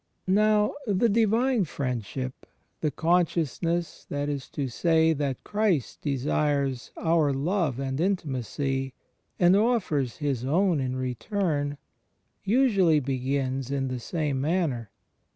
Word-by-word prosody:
Now 210 +2 +3
the 205 +3 +3
Divine 230 +2 +3
Friendship 130 -2 -4 0.2
— - - -46
the 155 - +1
consciousness, 170 0 0
that 145 0 -2
is 140 -3 -4
to 140 -2 -3
say, 160 +5 +3
that 140 -4 -3
Christ 205 - 0
desires 140 -1 0
oxir 160 -4 +2
love 155 -2 0
and 135 +2 -2
intimacy, 135 - -2 0.4
and 175 +1 +5
offers 195 - +1
His 140 -5 -1
own 170 +4 +2
in 130 -1 -2
return 145 - -2 0.3
— - - -47 0.2
usually 200 - +4
begins 135 -1 -2
in 135 -1 -1
the 130 -1 -3
same 145 0 -2
manner. 145 - 0
150 Hz, 120 wpm, -27 LUFS, 135-185 Hz, 0.4 s, and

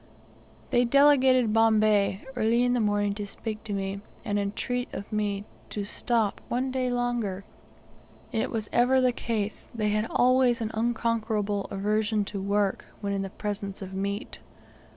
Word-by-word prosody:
They 240 - +4
delegated 260 -3 +5
Bombay 215 -2 +3
early 235 +1 +2
in 245 0 +2
the 245 - +2
morning 205 -2 +1
to 205 0 -4
speak 215 +1 -6
to 215 - -5
me, 195 0 -3 0.2
and 205 0 0
entreat 245 +5 -2
of 200 - -7
me 205 -1 -1 0.2
to 205 -1 -3
stop 220 0 0
one 255 +2 -1
day 255 -1 0
longer. 240 -6 -1 0.9
It 230 +3 0
was 220 -2 -3
ever 250 +2 +4
the 255 -1 +4
case; 220 -3 -3
they 215 -2 0
had 215 +2 0
always 255 -1 +3
an 220 -1 -2
unconquerable 220 -3 0
aversion 210 +1 0
to 200 - -3
work, 200 0 0
when 200 -1 -2
in 195 -1 -2
presence 200 -2 -4
of 190 0 -8
meat. 200 +2 -3
215 Hz, 150 wpm, -27 LUFS, 205-240 Hz, 0.9 s, delegated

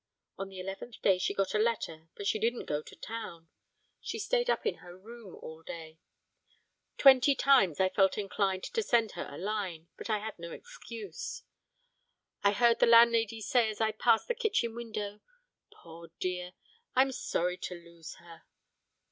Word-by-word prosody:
On 195 0 -5
the 190 -1 -9
eleventh 195 +5 -7
day 190 -2 +4
she - - 0
got 195 -1 0
a 210 - +2
letter 165 -8 -1
but 200 - -7
she 215 - +1
didn't 235 +2 0
go 150 0 -1
to - - -14
town, 210 -8 -7 0.5
she - - -5
stayed - - 0
up - - +1
in 445 - 0
her 175 0 -13
room 220 0 -12
all 160 0 -10
day; 160 -1 -9 1.0
twenty 270 0 +7
times 250 - +4
I 190 - +4
felt 190 0 +2
inclined 195 -2 -1
to 460 - -1
send 235 - +2
her - - -6
a 145 - -8
line, 185 -5 -4
but - - -7
I 215 - +2
had 215 -2 -7
no 170 0 -7
excuse. 230 - -8 1.0
I 200 - +4
heard 235 +2 +3
the - - +5
landlady 230 -1 +5
say 240 -1 +2
as 215 - -6
I 220 -1 +2
passed 215 +1 +2
the 485 - +1
kitchen 415 - 0
window: 215 -3 -5 0.5
'Poor 170 0 -13
dear! 180 0 -3 0.4
I'm 265 +1 +4
sorry 180 -7 -1
to 180 - -5
lose 170 -1 -11
her!' 170 -1 -15
205 Hz, 175 wpm, -31 LUFS, 180-235 Hz, 1.0 s, twenty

